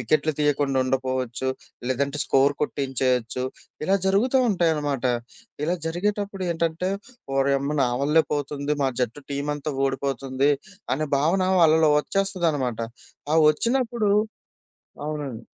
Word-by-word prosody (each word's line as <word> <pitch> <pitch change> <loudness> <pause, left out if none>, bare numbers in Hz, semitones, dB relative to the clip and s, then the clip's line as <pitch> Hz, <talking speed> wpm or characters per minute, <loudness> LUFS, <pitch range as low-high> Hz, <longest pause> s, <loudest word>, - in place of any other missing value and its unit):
వికెట్లు 155 +5 +1
తీయకుండా 145 -2 +2
ఉండపోవచ్చు, 130 -1 -1 0.4
లేదంటే 140 +3 -1
స్కోర్ 135 +1 +3
కొట్టించేయచ్చు, 130 -3 0 0.4
ఇలా 195 +3 +3
జరుగుతా 245 +7 +3
ఉంటాయనమాట. 150 -8 0 0.6
ఇలా 175 +3 0
జరిగేటప్పుడేంటంటే, 180 -2 -1 0.5
"ఓరేయమ్మ! 140 +2 +1
నా - - +1
వల్లే 155 +3 +4
పోతుంది. 145 0 -2
మా 135 - +2
జట్టు 125 +4 -2
టీమంతా 145 +1 -2
ఓడిపోతుంది" 135 +1 0 0.4
అనే 155 +3 -2
భావన 165 +7 +2 0.2
వాళ్ళలో 160 -1 +5
ఒచ్చేస్తదనమాట. 160 - -1 0.5
ఆ - - +4
ఒచ్చినప్పుడు 235 - 0 1.0
అవునండి. 145 -7 -5
145 Hz, 100 wpm, -24 LUFS, 135-170 Hz, 1.0 s, వాళ్ళలో